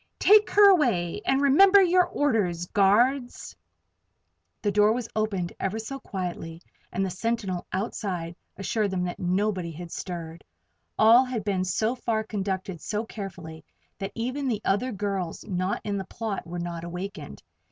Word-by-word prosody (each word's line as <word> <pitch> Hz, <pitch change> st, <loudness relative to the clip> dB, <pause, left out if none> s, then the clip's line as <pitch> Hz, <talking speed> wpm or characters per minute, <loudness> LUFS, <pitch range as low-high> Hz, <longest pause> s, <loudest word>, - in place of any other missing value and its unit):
Take 425 Hz, +1 st, +6 dB
her 410 Hz, 0 st, +7 dB
away 230 Hz, -, +1 dB
and 270 Hz, +1 st, +2 dB
remember 385 Hz, +9 st, +7 dB
your 365 Hz, -1 st, +4 dB
orders, 200 Hz, -12 st, 0 dB
guards." 240 Hz, +8 st, +1 dB, 1.1 s
The 205 Hz, -, +1 dB
door 210 Hz, +2 st, +4 dB
was 240 Hz, -1 st, -3 dB
opened 200 Hz, -5 st, -1 dB
ever 195 Hz, +3 st, -2 dB
so 250 Hz, +5 st, -6 dB
quietly 175 Hz, -6 st, -5 dB, 0.3 s
and 190 Hz, +2 st, -1 dB
the 190 Hz, -, -3 dB
sentinel 195 Hz, -2 st, -2 dB
outside 185 Hz, -4 st, -3 dB, 0.2 s
assured 205 Hz, +1 st, -1 dB
them 185 Hz, -1 st, -2 dB
that 175 Hz, -1 st, -4 dB
nobody 185 Hz, 0 st, 0 dB
had 165 Hz, +1 st, -9 dB
stirred. 170 Hz, -3 st, -6 dB, 0.5 s
All 230 Hz, +4 st, +7 dB
had 250 Hz, -5 st, -4 dB
been 195 Hz, -3 st, 0 dB
so 220 Hz, +5 st, 0 dB
far 230 Hz, -3 st, -1 dB
conducted 190 Hz, -4 st, -4 dB
so 215 Hz, +2 st, -3 dB
carefully 175 Hz, -7 st, -8 dB, 0.4 s
that 195 Hz, -1 st, -4 dB
even 255 Hz, +4 st, -2 dB
the 220 Hz, -4 st, -1 dB
other 235 Hz, +7 st, +1 dB
girls 195 Hz, -4 st, -3 dB
not 185 Hz, 0 st, -1 dB
in 205 Hz, -1 st, -2 dB
the 190 Hz, -, -4 dB
plot 210 Hz, -3 st, -5 dB
were 175 Hz, +1 st, -6 dB
not 170 Hz, -1 st, -5 dB
awakened. 180 Hz, +4 st, -7 dB
200 Hz, 150 wpm, -26 LUFS, 180-230 Hz, 1.1 s, her